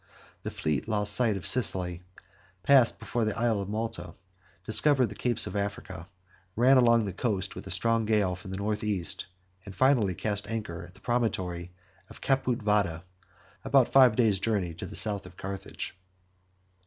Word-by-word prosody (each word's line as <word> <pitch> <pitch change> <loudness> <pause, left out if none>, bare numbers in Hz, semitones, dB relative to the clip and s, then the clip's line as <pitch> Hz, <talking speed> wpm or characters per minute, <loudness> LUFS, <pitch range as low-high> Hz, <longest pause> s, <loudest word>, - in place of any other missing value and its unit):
The - - -4
fleet 75 +3 -2
lost 105 -2 +1
sight 110 -2 +1
of 90 - -8
Sicily, 90 -8 +1 0.6
passed 130 -2 +5
before 120 - -2
the 110 -1 -2
Isle 115 -3 +1
of 100 - -6
Malta, 110 +2 -4 0.5
discovered 130 +2 +3
the - - -7
capes 120 -1 +1
of 95 - -6
Africa, 100 -3 -4 0.5
ran 130 +4 +5
along 115 -3 +4
the 100 - -4
coast 100 -1 -2
with - - -9
a - - -7
strong 115 +5 +1
gale 105 -4 +1
from 95 +2 -11
the 95 - -5
north 105 +2 -2
east, 100 -6 -2 0.4
and 100 -1 -10
finally 125 -9 +3
cast 105 +1 -3
anchor 105 -7 -5
at 90 +1 -13
the 95 - -19
promontory 95 -8 -2 0.4
of - - -13
Caput 130 -4 0
Vada, 100 -6 +1 0.6
about 135 -3 +3
five 130 -4 +6
days' 110 -5 +2
journey 100 -5 -1
to 80 - -7
the - - -9
south 100 -3 +1
of 90 - -15
Carthage. 95 -1 -6
105 Hz, 170 wpm, -28 LUFS, 95-115 Hz, 0.6 s, five